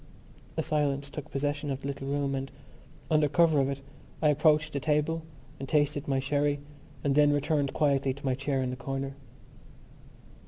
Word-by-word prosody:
A 160 - +1
silence 145 -3 0
took 150 - -7
possession 145 +1 -2
of 135 0 -3
the 140 - -4
little 135 -1 -5
room 140 0 0
and, 135 0 -3 0.6
under 155 -1 +4
cover 160 0 +4
of 135 0 +2
it, 140 0 -4 0.4
I 150 - +4
approached 155 +1 +3
the 140 - 0
table 150 +4 +1 0.4
and 135 -1 -6
tasted 145 -1 +1
my 135 -1 +1
sherry 145 +2 +1 0.4
and 140 - +2
then 145 +1 +5
returned 145 -1 +1
quietly 140 -3 +2
to 140 - -10
my 130 - +2
chair 135 0 -1
in 125 - -2
the - - -3
corner. 135 +1 -4
140 Hz, 180 wpm, -29 LUFS, 135-150 Hz, 0.6 s, then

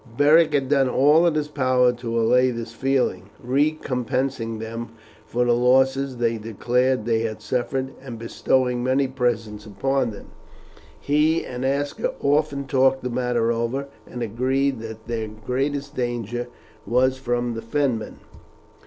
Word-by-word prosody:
Beric 155 +2 +5
had 135 -2 +1
done 135 -3 +3
all 150 +7 +5
in 165 - +1
his 150 -1 0
power 130 -4 +2
to 120 -1 -3
allay 125 +3 +4
this 115 -2 -5
feeling, 135 +2 0
recompensing 130 -3 -1
them 115 +1 -6 0.3
for 125 +1 0
the 120 - +3
losses 130 +2 +2
they 115 -1 0
declared 120 +2 0
they 115 -1 +2
had 110 -1 -3
suffered, 130 +4 -2
and 125 -4 -8
bestowing 125 +2 0
many 130 +2 +2
presents 115 -5 -2
upon 135 +6 0
them. 105 -2 -10 0.7
He 155 +3 +2
and 125 0 -5
Aska 140 +2 -1
often 140 -1 +1
talked 135 -1 +2
the 125 - -3
matter 120 -2 0
over, 120 +4 -2 0.2
and 120 -1 -5
agreed 130 +4 0
that 110 0 -8
their 115 -2 -3
greatest 135 +7 -3
danger 120 -1 -3 0.4
was 130 +2 +2
from 120 -1 -1
the 115 - -5
Fenmen. 120 -2 -1
125 Hz, 145 wpm, -23 LUFS, 115-135 Hz, 0.7 s, Beric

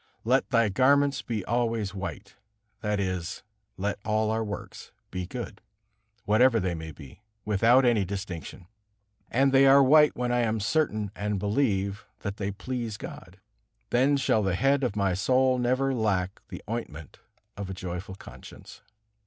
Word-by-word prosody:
"Let 130 +4 +2
thy 115 -4 +3
garments 140 +4 +3
be 110 -5 -4
always 115 -4 -1
white," 95 0 -6 0.5
that 105 -1 -1
is, 95 -3 -3 0.3
let 100 +2 -2
all 110 0 +1
our 110 0 0
works 105 -2 -7 0.2
be 90 -1 -4
good, 120 -2 -7 0.6
whatever 115 +3 +4
they 90 -3 -1
may 80 -1 -6
be, 70 +3 -14 0.2
without 115 +5 +4
any 115 -4 +3
distinction. 95 -2 -6 0.6
And 135 +2 +3
they 135 0 +6
are 135 +1 +7
white 150 +3 +5
when 125 0 -1
I 120 - +2
am 110 -2 0
certain 105 -3 0
and 105 0 -2
believe 100 -2 -1
that 100 0 -4
they 100 -1 -2
please 115 +1 -4
God. - - -10 0.5
Then 135 +4 +3
shall 115 -5 +2
the 95 -3 0
head 135 +6 +2
of 120 -5 -1
my 100 -3 +1
soul 130 +6 +2
never 130 +2 +1
lack 100 -5 -1
the - - -8
ointment 95 -9 -6 0.4
of 100 -1 -6
a - - -4
joyful 90 +1 -6
conscience. 65 -8 -13
110 Hz, 155 wpm, -27 LUFS, 95-125 Hz, 0.6 s, are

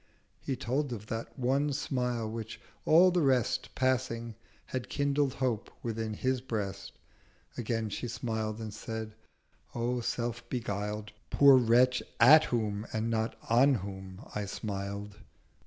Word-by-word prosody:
'— - - -41
He 135 - 0
told 135 +3 -1
of 110 -2 -7
that 115 +1 -5
one 135 +4 +1
Smile, 125 -4 -1
which, 110 0 -6 0.3
all 175 +4 +7
the 180 -1 +2
Rest 130 -3 +1
Passing, 120 -3 0 0.3
had 130 -1 -4
kindled 140 -1 +1
Hope 120 -5 -1
within 110 -2 -3
his 130 +2 0
Breast— 100 -6 -4 0.6
Again 115 -1 -1
she 120 - -3
smiled 110 -2 -3
and 110 -2 -6
said, 110 0 -5 0.6
'O 120 +1 0
self 120 0 -2
beguiled 105 -3 -3 0.2
Poor 140 -1 +7
Wretch, 125 +1 +4 0.2
at 150 +6 +8
whom 110 -2 -1
and 110 +1 -1
not 110 0 0
on 130 +4 +5
whom 95 -2 -7
I 105 -1 -2
smiled.' 100 0 -5
115 Hz, 140 wpm, -31 LUFS, 110-130 Hz, 0.6 s, at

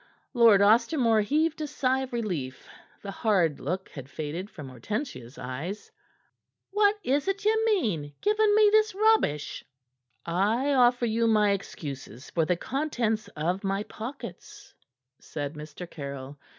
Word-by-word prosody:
Lord 230 -5 +6
Ostermore 230 +1 +4
heaved 310 +8 0
a 305 - -2
sigh 265 -2 0
of 265 -1 -5
relief; 175 - -4 0.4
the 200 - -5
hard 190 - +1
look 180 +7 -3
had 135 -2 -10
faded 160 +7 -5
from 145 -8 -9
Hortensia's 130 - -5
eyes. 145 +11 -6 0.8
"What 410 +1 +4
is't 385 +10 0
ye 435 +1 +4
mean, 215 - 0
giving 420 0 +3
me 425 -1 +6
this 435 -1 +3
rubbish?" 425 - +2 0.6
"I 215 +11 +1
offer 245 -2 +4
you 230 0 +1
my 210 -2 +4
excuses 140 - -6
for 165 -2 +1
the 175 +2 +1
contents 240 - -1
of 175 +6 -1
my 195 +1 -1
pockets," 280 - -9 0.5
said 145 -1 -5
Mr. 155 +3 -8
Caryll. 140 -2 -8
215 Hz, 135 wpm, -27 LUFS, -, 0.8 s, Lord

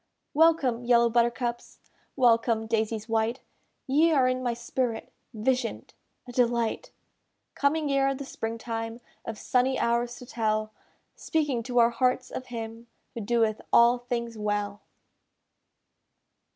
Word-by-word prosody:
Welcome, 295 -7 +3
yellow 235 -1 +4
buttercups! 240 0 -1 0.4
Welcome, 230 -3 +3
daisies 220 0 -1
white! 225 +2 0 0.5
Ye 305 +5 +3
are 270 -5 +4
in 255 0 0
my 240 -2 -1
spirit 240 0 -3 0.2
Vision'd, 245 +1 -2 0.3
a - - -7
delight! 240 - 0 0.6
Coming 290 +1 +1
ere 275 0 +2
the 280 +1 -7
spring 225 -3 -4
time, 225 0 -5 0.3
Of 225 -2 -5
sunny 255 +3 +1
hours 235 +1 0
to 250 - -11
tell 215 -2 -1 0.4
Speaking 295 -7 -1
to 245 +1 -4
our 235 0 +6
hearts 255 +2 0
of 255 - -6
Him 230 -1 -7 0.3
Who 235 - -5
doeth 220 0 +1
all 235 +1 +6
things 235 -2 -4
well. 205 -1 -2
235 Hz, 125 wpm, -27 LUFS, 225-255 Hz, 0.6 s, our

